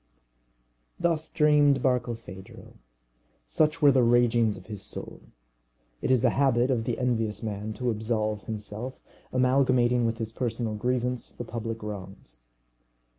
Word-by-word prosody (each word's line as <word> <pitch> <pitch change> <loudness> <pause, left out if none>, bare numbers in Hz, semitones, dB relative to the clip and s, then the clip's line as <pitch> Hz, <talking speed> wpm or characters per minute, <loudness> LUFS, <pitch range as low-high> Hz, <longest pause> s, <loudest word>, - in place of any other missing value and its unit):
Thus 165 -2 0
dreamed 150 -4 +4
Barkilphedro. 115 -7 -3 0.7
Such 155 - +1
were 145 - +8
the 130 -1 +4
ragings 120 -2 +3
of 95 - -13
his 105 -3 -7
soul. 100 - -7 0.8
It - - -1
is 130 -3 +3
the - - +4
habit 130 -2 +2
of 115 -3 0
the 120 - -1
envious 115 -4 -1
man 105 0 -4
to 120 +3 -1
absolve 110 -1 -2
himself, 110 +4 -6 0.3
amalgamating 125 -2 +3
with 115 0 -2
his 110 -1 -4
personal 115 -2 -2
grievance 125 +2 -2
the 120 - -7
public 115 -1 -5
wrongs. 95 -11 -8
120 Hz, 130 wpm, -27 LUFS, 110-130 Hz, 0.8 s, were